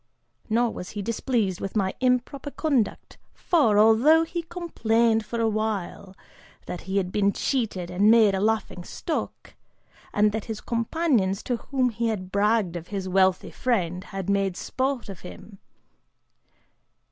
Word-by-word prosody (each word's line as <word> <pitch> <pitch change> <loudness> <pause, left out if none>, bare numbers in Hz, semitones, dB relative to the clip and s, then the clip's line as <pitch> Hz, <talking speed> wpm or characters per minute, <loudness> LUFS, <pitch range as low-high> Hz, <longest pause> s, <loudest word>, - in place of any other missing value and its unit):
Nor 235 +1 +2
was 180 - -7
he 205 - -2
displeased 225 -4 -1
with 195 - -5
my 195 -3 +1
improper 255 +3 0
conduct 280 -7 -1 0.2
for, 275 - +2
although 230 +10 +6
he 340 +1 -4
complained 235 -10 0
for 235 +2 -5
a 225 - +2
while, 210 -3 -3 0.5
that 180 - -6
he 195 - 0
had 185 -2 0
been 200 0 +2
cheated 205 -9 -2
and 200 +4 +3
made 220 -3 +6
a 190 - 0
laughing 210 -3 -1
stock, 320 - -5 0.6
and 210 0 +3
that 215 0 -4
his 220 -2 -5
companions, 230 - 0
to 245 - -1
whom 255 0 0
he 230 0 -2
had 185 -4 -3
bragged 205 -3 +1
of 170 0 -6
his 195 -2 -4
wealthy 185 0 +2
friend, 185 -7 -1
had 195 -2 -6
made 195 -2 0
sport 260 -2 -2
of 195 -4 -8
him. 195 +2 -12
215 Hz, 150 wpm, -25 LUFS, 195-240 Hz, 0.6 s, although